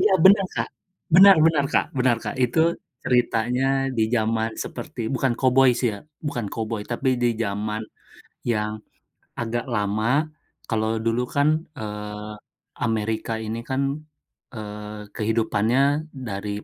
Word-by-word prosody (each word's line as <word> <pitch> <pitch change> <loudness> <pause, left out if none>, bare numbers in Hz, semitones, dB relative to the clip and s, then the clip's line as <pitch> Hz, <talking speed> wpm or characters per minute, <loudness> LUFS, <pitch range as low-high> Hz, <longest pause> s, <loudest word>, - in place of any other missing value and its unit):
Iya 410 - +4
benar 195 +1 +7
Kak, - - -1 0.5
benar 195 +1 +9
benar 150 -3 +3
Kak - - +3
benar 125 -2 +3
Kak, - - -3
itu 125 +5 +1 0.4
ceritanya 125 +1 +1 0.3
di 110 - +2
zaman 110 0 +1
seperti - - -7
bukan 130 0 +1
koboi 130 0 +5
sih 125 - +2
ya, - - -8 0.3
bukan 120 -7 -2
koboi 110 -1 -3
tapi 125 +3 -1
di 120 - +4
zaman 105 +1 -2 0.7
yang 105 -1 0 0.7
agak 120 0 -2
lama 105 +1 0 0.6
kalau 110 -1 0 0.2
dulu 115 +1 +1
kan, 145 +1 +4 0.3
eee, 105 0 -6 0.5
Amerika 110 0 -1
ini 110 +1 -3
kan, 130 +1 0 0.7
eee, 105 -1 -7
kehidupannya 110 +2 +1 0.5
dari, 100 0 -4
115 Hz, 125 wpm, -24 LUFS, 105-125 Hz, 0.7 s, benar